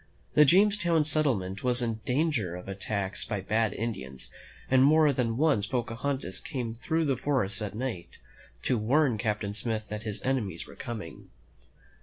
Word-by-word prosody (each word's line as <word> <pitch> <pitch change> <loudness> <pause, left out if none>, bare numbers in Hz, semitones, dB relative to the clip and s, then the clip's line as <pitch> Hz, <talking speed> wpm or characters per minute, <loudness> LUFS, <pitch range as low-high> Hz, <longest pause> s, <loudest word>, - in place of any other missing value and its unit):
The 150 - +7
Jamestown 175 -1 +4
settlement 125 -12 0
was 125 -1 +3
in 115 -2 -2
dan 155 +6 +2
ger 100 - -2
of 90 - -9
attacks 100 0 -3
by 105 -3 -3
bad 110 +3 +1
Indians, 95 - -5 0.4
and 130 0 +5
more 150 +1 +5
than 120 -3 -1
once 140 -9 +2
Pocahontas 120 -3 -2
came 125 -7 -4
through 160 +7 -1
the 140 - +2
great 125 - -7
forest 110 -9 +1
at 105 -1 -4
night 115 -7 -5 0.5
to 125 - +1
warn 125 +1 +2
Captain 105 -3 -1
Smith 110 +1 -2
that 105 0 -4
his 110 -2 -4
enemies 110 -11 -1
were - - -13
coming. 105 -10 -7
115 Hz, 165 wpm, -28 LUFS, 105-140 Hz, 0.5 s, The